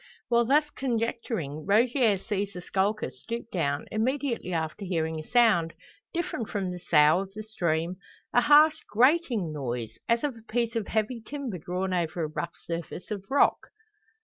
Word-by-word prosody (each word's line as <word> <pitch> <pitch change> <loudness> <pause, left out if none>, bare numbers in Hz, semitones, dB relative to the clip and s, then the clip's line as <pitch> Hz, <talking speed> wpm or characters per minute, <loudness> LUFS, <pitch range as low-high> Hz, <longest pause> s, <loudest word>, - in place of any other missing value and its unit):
While 235 0 +4
thus 295 +5 +4
conjecturing, 230 - -2
Rogier 230 +1 +4
sees 200 +1 -3
the 180 - -7
skulker 205 +4 0
stoop 230 0 -7
down, 145 -6 -1
immediately 245 -2 -1
after 160 +3 -2
hearing 160 -4 -1
a 155 - -9
sound, 215 -9 +4 0.4
different 340 - -3
from 195 -3 -2
the 180 - -6
sough 155 -1 +5
of 195 0 -6
the 215 - -5
stream; 175 -4 -1 0.4
a 245 - +5
harsh 300 +2 +6
grating 240 - +2
noise, 120 -6 -4
as 235 +3 +2
of 285 -4 -1
a 225 -1 -16
piece 235 0 0
of 225 -4 -1
heavy 220 +2 -1
timber 260 -7 -5
drawn 185 +3 -2
over 170 -1 -1
a - - 0
rough 170 +3 -5
surface 170 +3 -6
of 200 -2 -4
rock. 280 +1 +3
205 Hz, 165 wpm, -27 LUFS, 170-235 Hz, 0.4 s, harsh